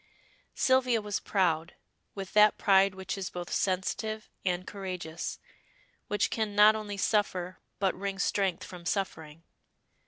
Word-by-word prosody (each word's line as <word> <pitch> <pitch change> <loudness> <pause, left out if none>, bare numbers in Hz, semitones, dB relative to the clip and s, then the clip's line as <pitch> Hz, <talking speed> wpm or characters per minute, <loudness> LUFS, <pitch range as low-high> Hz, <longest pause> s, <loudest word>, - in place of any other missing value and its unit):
Sylvia 255 -3 +3
was 210 -1 -3
proud, 170 -5 0 0.4
with 195 -2 -6
that 210 0 +6
pride 195 -1 +4
which 190 +1 -5
is 190 - -3
both 175 -1 -6
sensitive 215 +3 -1
and 180 -1 -1
courageous, 180 -5 -5 0.7
which 210 -1 0
can 215 -2 -2
not 210 +1 +7
only 210 -2 -5
suffer 185 -4 0 0.2
but 195 -1 +1
wring 195 +1 -4
strength 195 -2 0
from 180 -1 -10
suffering. 165 -4 -3
195 Hz, 130 wpm, -29 LUFS, 180-210 Hz, 0.7 s, not